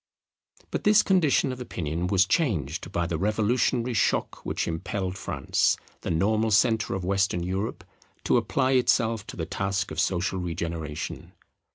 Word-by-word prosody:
But - - -2
this 210 0 +5
condition 160 -8 +3
of 125 0 -7
opinion 85 -6 -3
was 95 0 +4
changed 95 - -1
by 85 - 0
the 85 -2 -2
revolutionary 115 +4 +1
shock 95 -7 0
which - - -2
impelled 90 +3 -3
France, 75 -8 0 0.2
the - - -4
normal 110 +7 +2
centre 110 0 +2
of 95 -2 -4
Western 95 -2 +1
Europe, 95 +4 -3 0.4
to - - +3
apply 130 -1 +1
itself 115 -4 +2
to - - -8
the 80 - -2
task 100 +3 -2
of - - -4
social 95 +1 0
regeneration. 85 -3 -5
100 Hz, 150 wpm, -26 LUFS, 85-115 Hz, 0.4 s, this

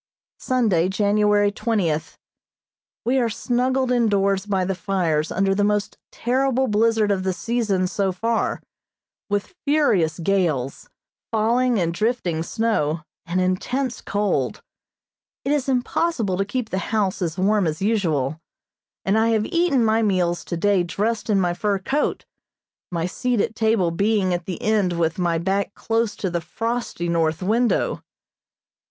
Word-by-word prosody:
Sunday, 210 -9 +1
January 205 0 +2
twentieth: 195 -8 -1 0.9
We 260 +3 +2
are 235 -2 +1
snuggled 250 +3 0
indoors 200 -4 +2
by 190 -2 +1
the 195 - -1
fires 175 -5 -1
under 195 +1 +1
the 205 +1 +1
most 210 0 0
terrible 265 +1 +1
blizzard 220 -1 +2
of 195 -2 +1
the 190 0 -1
season 215 -3 0
so 195 +1 0
far, 225 +5 -1 0.7
with 205 - -2
furious 210 - +2
gales, 165 -8 -1 0.4
falling 235 +2 +2
and 170 -3 0
drifting 185 -5 -1
snow, 165 -6 0 0.3
and 175 +2 0
intense 240 +8 -1
cold. 195 -11 -1 0.8
It 275 - 0
is 285 -2 0
impossible 250 - 0
to 195 +2 0
keep 235 +2 -3
the 190 - 0
house 205 -4 0
as 170 -1 -2
warm 200 0 +2
as 155 0 -2
usual, 165 - 0 0.7
and 200 +3 +3
I 225 +1 +3
have 220 -2 +2
eaten 335 -7 +2
my 220 +1 +3
meals 180 -5 +1
today 185 +2 +1
dressed 210 +7 -2
in 205 -2 +3
my 175 -2 +1
fur 200 +3 0
coat, 270 +10 -1 0.7
my 170 -1 -1
seat 245 +6 -1
at 210 - 0
table 220 -6 +2
being 200 +1 +1
at 175 -1 -3
the 185 - -4
end 210 -4 +2
with 165 0 -1
my 170 -2 +1
back 195 +4 -1
close 225 -2 -1
to 190 - -3
the 170 0 -1
frosty 225 0 -3
north 165 0 0
window. 230 +5 +1
205 Hz, 145 wpm, -22 LUFS, 180-230 Hz, 0.9 s, and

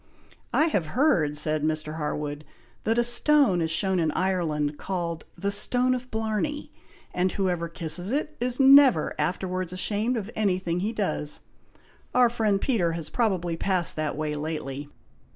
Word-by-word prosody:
"I 310 - +3
have 200 - 0
heard," 170 - +2
said 155 0 0
Mr. 155 0 -1
Harwood, 150 -1 -3 0.4
"that 225 +1 +1
a 240 - +4
stone 240 - +4
is 160 - 0
shown 185 +4 +1
in 160 -2 +1
Ireland, 155 -6 -1
called 170 -4 -4
'the 200 0 -1
stone 250 +5 +2
of 255 0 -5
Blarney,' 220 +7 -2 0.4
and 180 +1 +1
whoever 180 -4 -1
kisses 165 +2 0
it, 300 +4 -2
is 245 +1 -2
never 270 - +6
afterwards 185 +3 -2
ashamed 210 +6 0
of 220 0 -5
any 200 -4 +1
thing 175 -2 -2
he 205 +4 -1
does. 190 -9 -2 0.7
Our 250 -2 +5
friend 215 -4 +1
Peter 195 -9 0
has 165 -2 -6
probably 185 -8 0
passed 180 0 0
that 155 -2 -2
way 155 -1 -2
lately!" 145 -2 -5
185 Hz, 155 wpm, -26 LUFS, 160-225 Hz, 0.7 s, never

